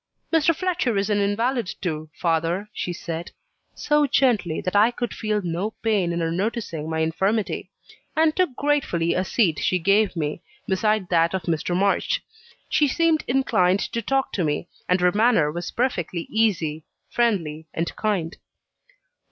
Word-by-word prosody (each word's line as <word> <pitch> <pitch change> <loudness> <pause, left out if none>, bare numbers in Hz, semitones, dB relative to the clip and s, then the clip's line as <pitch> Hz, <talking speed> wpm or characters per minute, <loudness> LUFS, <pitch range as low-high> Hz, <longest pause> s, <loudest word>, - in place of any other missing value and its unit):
"Mr. 325 0 +4
Fletcher 350 - 0
is 200 +2 0
an 205 - +2
invalid 225 +2 0
too, 155 -4 -3
father," 170 +4 0
she 180 - -3
said; 170 -1 -5 0.5
so 295 -1 +2
gently, 220 - +2
that 185 - -3
I 210 +3 +6
could 240 -1 -4
feel 210 -2 -1
no 180 +5 -3
pain 205 -6 +1
in 170 0 -2
her 165 0 0
noticing 185 -4 -3
my 160 0 -1
infirmity; 190 +7 -1 0.5
and 315 0 +3
took 365 -9 +1
gratefully 275 - +1
a 185 - 0
seat 185 -5 +1
she 185 - +1
gave 200 +3 +2
me, 155 -1 -3 0.3
beside 205 0 +1
that 170 +1 +3
of 185 - -3
Mr. 170 +2 -1
March. 200 - +1 0.4
She 295 - +3
seemed 320 +3 +2
inclined 200 -8 +2
to 230 0 -2
talk 270 +4 0
to 185 - 0
me; 150 +2 -1 0.2
and 180 +1 +3
her 180 0 +4
manner 210 -8 +3
was 175 +2 -4
perfectly 180 -9 -1
easy, 170 -9 +1 0.3
friendly, 165 -10 0
and 165 +1 -3
kind. 190 -6 -1
195 Hz, 160 wpm, -23 LUFS, 170-235 Hz, 0.5 s, I